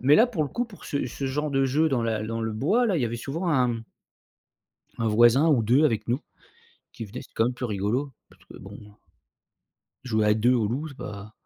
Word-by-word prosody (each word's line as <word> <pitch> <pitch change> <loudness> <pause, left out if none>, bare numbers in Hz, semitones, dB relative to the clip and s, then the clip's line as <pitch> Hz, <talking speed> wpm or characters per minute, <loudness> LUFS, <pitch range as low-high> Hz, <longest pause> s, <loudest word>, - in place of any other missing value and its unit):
Mais 140 +4 +5
là, 230 - +6
pour 225 -11 -2
le 145 - -2
coup, 245 - -2
pour 220 -5 -14
ce 140 - -2
ce 135 +3 -5
genre 150 +3 -2
de 135 -1 +2
jeu 150 +5 +2
dans 125 -3 +1
la 110 -2 -1
dans 115 +1 -3
le 110 0 -2
bois, 195 - +2
là, 200 -5 +1
il 145 - 0
y - - +2
avait 115 0 -3
souvent 155 +9 -3
1 125 -6 +1 1.2
1 115 - +1
voisin 120 +7 +5
ou 135 -8 +3
2 125 +7 +3
avec 110 -7 +1
nous, 120 +3 0 0.7
qui 115 - -7
venaient, 125 +6 -8
c'est - - -18
quand 115 - +2
même 125 +2 -1
plus 125 - -6
rigolo, 115 +6 -1 0.2
parce - - -23
que, - - -13
bon, 95 +1 -11
heu 105 -1 -13 1.1
jouer 110 -4 0
à 105 - +4
2 120 +4 +3
au 115 -4 +1
loup, 135 +8 -3
c'est 135 - -13
pas 105 +1 -8
125 Hz, 240 wpm, -25 LUFS, 110-145 Hz, 1.2 s, là